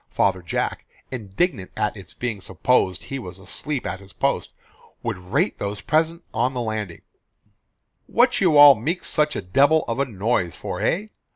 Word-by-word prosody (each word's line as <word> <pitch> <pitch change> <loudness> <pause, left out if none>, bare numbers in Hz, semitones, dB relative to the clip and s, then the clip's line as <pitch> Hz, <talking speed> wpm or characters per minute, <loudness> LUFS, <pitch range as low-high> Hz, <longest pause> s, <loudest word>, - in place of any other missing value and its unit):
Father 95 -2 +1
Jack, 85 - -3 0.2
indignant 110 - -2
at 105 - 0
its 95 -3 -11
being 115 -5 -3
supposed 95 -1 +1
he 135 - -5
was 90 -7 -8
asleep 125 +9 -4
at 90 +1 -3
his 100 -1 -16
post, - - 0 0.5
would - - -3
rate 140 - -1
those 100 +1 -3
present 165 +2 +1
on 125 +4 +1
his 125 - -1
landing, 105 -6 -4 1.0
"What 245 0 +3
you 170 -6 +4
all 145 -1 +11
meek 150 - -3
such 150 0 +1
a - - -3
debil 140 +12 +4
of 115 +3 -2
a 140 - +2
noise 105 -5 -1
for, - - -5
hey? 210 +5 0
120 Hz, 170 wpm, -23 LUFS, 95-150 Hz, 1.0 s, all